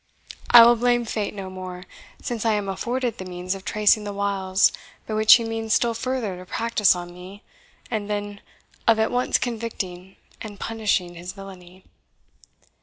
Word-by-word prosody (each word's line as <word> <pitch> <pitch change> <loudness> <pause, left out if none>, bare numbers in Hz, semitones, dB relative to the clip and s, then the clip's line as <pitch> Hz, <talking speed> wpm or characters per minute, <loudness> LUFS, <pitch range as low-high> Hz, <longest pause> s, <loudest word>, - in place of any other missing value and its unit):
I 235 -1 +10
will 240 +1 +6
blame 240 0 +2
fate 215 -2 -3
no 190 -2 -7
more, 185 -1 -8 0.4
since 240 -5 -3
I 225 -1 +2
am 205 -1 -2
afforded 240 +4 -3
the - - -4
means 180 0 -4
of 195 -1 -8
tracing 210 +1 +2
the 205 - -5
wiles 195 -1 +1 0.3
by 220 - -5
which 215 0 +7
he 235 - 0
means 225 -1 -1
still 235 -1 +1
further 230 -5 -3
to 180 - -10
practise 225 -4 +2
on 175 0 -7
me, 185 +4 -12 0.5
and 210 -3 -3
then 205 -1 -4 0.5
of 230 -1 +5
at 220 0 +1
once 250 +1 +1
convicting 195 -6 -5 0.3
and 205 -3 -8
punishing 210 -6 -1
his 175 +1 -8
villainy. 185 -2 -13
205 Hz, 170 wpm, -23 LUFS, 185-225 Hz, 0.5 s, I